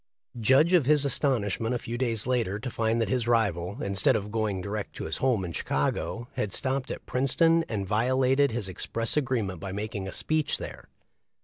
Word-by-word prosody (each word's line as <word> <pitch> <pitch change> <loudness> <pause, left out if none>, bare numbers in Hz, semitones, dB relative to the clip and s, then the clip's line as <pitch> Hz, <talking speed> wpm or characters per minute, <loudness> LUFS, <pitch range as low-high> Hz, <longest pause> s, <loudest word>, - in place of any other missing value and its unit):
Judge 135 +10 +4
of 165 -8 +4
his 150 -1 +4
astonishment 120 - 0
a - - +1
few 115 0 -6
days 115 -4 +1
later 115 -6 0
to 125 +4 -5
find 115 +1 0
that 115 - +1
his 125 -3 -1
rival, 100 - 0
instead 100 -1 +2
of 105 +1 -3
going 110 -3 -1
direct 100 +1 -5
to - - -6
his 80 - -3
home 120 -8 +1
in 85 - -5
Chicago, 85 +11 -2
had 105 - -2
stopped 130 +4 -1
at - - -6
Princeton 165 +6 +3
and 100 -4 -3
violated 130 +6 +2
his 115 -4 -3
express 115 +4 0
agreement 120 - -1
by 95 +1 -6
making 100 -1 -4
a - - -5
speech 155 - 0
there - - -9
115 Hz, 190 wpm, -27 LUFS, 100-130 Hz, -, Judge